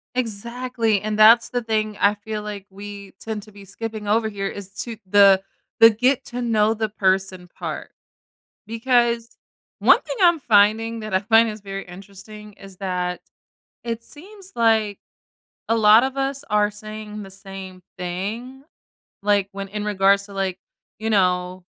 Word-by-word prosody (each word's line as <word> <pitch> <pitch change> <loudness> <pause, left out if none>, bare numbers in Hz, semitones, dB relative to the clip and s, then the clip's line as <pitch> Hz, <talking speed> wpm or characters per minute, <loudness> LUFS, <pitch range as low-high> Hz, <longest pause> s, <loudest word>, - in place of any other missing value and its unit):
Exactly, 235 -1 -1
and 215 0 -3
that's 230 +2 +7
the 245 -1 -2
thing 215 -2 -1
I 205 +1 +4
feel 210 0 -6
like 205 -2 -7
we 200 0 -10
tend 220 -2 -5
to 215 - -17
be 200 -1 -13
skipping 215 +1 -6
over 220 +1 +2
here 195 -2 -3
is 195 -1 -9
to 230 -2 -7
the 195 -1 +6 0.4
the 225 0 +10
get 250 +5 +1
to 245 0 -5
know 220 -1 +2
the 220 0 -2
person 190 -3 -1
part. - - -6 0.8
Because 235 0 0 0.4
one - - +5
thing - - -6
I'm 345 -3 +5
finding 225 0 +3
that 215 -2 -6
I 185 - +4
find 225 +2 +4
is 210 -1 -8
very 195 -1 -6
interesting 200 +3 -12
is 195 -2 -14
that 180 -2 -3 0.6
it 230 -1 -4
seems 385 - -11
like 220 -3 +2 0.7
a 225 0 +2
lot 215 +2 +7
of 265 +1 -3
us 275 +1 -2
are 210 0 +2
saying 215 0 -8
the 195 - -11
same 195 -1 -10 0.2
thing, 210 +9 -5 0.6
like, 200 -1 +1
when 195 0 -6
in 205 +1 -5
regards 200 -1 +2
to, 200 - -12
like, 190 -2 -2 0.4
you 220 +1 -2
know, 180 -2 +1
210 Hz, 160 wpm, -22 LUFS, 195-225 Hz, 0.8 s, the